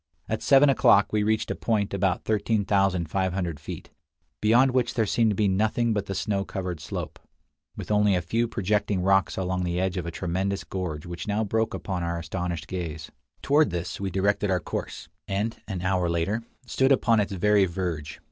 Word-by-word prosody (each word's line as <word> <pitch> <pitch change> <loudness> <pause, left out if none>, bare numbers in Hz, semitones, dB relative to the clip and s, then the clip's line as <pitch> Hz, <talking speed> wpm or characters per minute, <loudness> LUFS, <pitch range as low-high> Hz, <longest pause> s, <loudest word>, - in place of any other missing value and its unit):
At 110 - -2
seven 140 +1 +6
o'clock 105 -7 +4
we 105 - +2
reached 110 +1 0
a - - -2
point 105 -4 -1
about 95 -2 0
13,500 95 -5 0
feet, 75 - -8 0.5
beyond 120 +5 +4
which 125 -1 0
there 115 -3 +2
seemed 115 +2 +2
to 105 - 0
be 105 +1 +2
nothing 110 +4 +1
but 100 -1 -2
the 95 - -3
snow 100 -1 -1
covered 90 -4 -5
slope, 80 - -6 0.6
with - - -5
only 105 -1 +4
a 90 - +1
few 115 +7 0
projecting 105 -2 0
rocks 95 0 +2
along 95 -1 -1
the 90 0 -1
edge 95 0 -1
of 85 -1 -3
a - - -1
tremendous 95 +3 -2
gorge 90 -4 -5
which 85 +2 -6
now 105 +1 0
broke 110 +2 0
upon 95 -3 -4
our 85 0 -2
astonished 85 0 -4
gaze. 85 -5 -5 0.3
Toward 150 0 +4
this 85 +2 -4
we 100 - -1
directed 100 +2 +1
our 90 -1 +2
course, - - -5 0.2
and, 105 +3 -2
an 95 -4 -4
hour 90 -2 +1
later, 85 +7 0 0.2
stood 130 +2 +2
upon 115 -4 +4
its 100 -1 -1
very 100 +1 +3
verge. 85 -4 -4
95 Hz, 185 wpm, -26 LUFS, 90-105 Hz, 0.6 s, seven